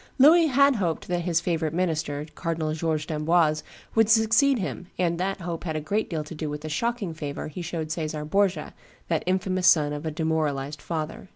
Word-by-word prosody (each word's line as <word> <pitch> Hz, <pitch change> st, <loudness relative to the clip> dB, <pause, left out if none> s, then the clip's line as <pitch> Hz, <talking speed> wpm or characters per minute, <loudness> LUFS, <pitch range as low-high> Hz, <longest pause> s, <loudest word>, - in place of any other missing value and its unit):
Louis 320 Hz, +5 st, +7 dB
had 280 Hz, -1 st, +4 dB
hoped 170 Hz, -5 st, -2 dB
that 175 Hz, -1 st, -1 dB
his 170 Hz, -2 st, +1 dB
favorite 165 Hz, -2 st, -1 dB
minister, 160 Hz, -4 st, -1 dB
Cardinal 160 Hz, -2 st, -2 dB
George 155 Hz, -1 st, -1 dB
d'Amboise, 155 Hz, 0 st, +2 dB, 0.3 s
would 225 Hz, -1 st, +4 dB
succeed 225 Hz, +5 st, +4 dB
him, 185 Hz, -3 st, -4 dB
and 170 Hz, -1 st, 0 dB
that 195 Hz, +1 st, -2 dB
hope 170 Hz, -1 st, -4 dB
had 160 Hz, -3 st, -3 dB
a -, -, 0 dB
great 205 Hz, +8 st, -1 dB
deal 160 Hz, -3 st, -2 dB
to 150 Hz, -, -9 dB
do 155 Hz, -1 st, -4 dB
with 150 Hz, 0 st, -5 dB
the 155 Hz, -, -6 dB
shocking 225 Hz, +2 st, -2 dB
favor 145 Hz, -2 st, -5 dB
he 165 Hz, +4 st, -7 dB
showed 165 Hz, -2 st, -4 dB
Caesar 155 Hz, -2 st, -3 dB
Borgia, 185 Hz, -1 st, 0 dB, 0.4 s
that 165 Hz, -2 st, +1 dB
infamous 185 Hz, 0 st, +1 dB
son 150 Hz, -5 st, +5 dB
of 145 Hz, +1 st, -5 dB
a 160 Hz, -, -2 dB
demoralized 155 Hz, -3 st, -1 dB
father. 160 Hz, +2 st, -5 dB
165 Hz, 195 wpm, -26 LUFS, 155-185 Hz, 0.4 s, Louis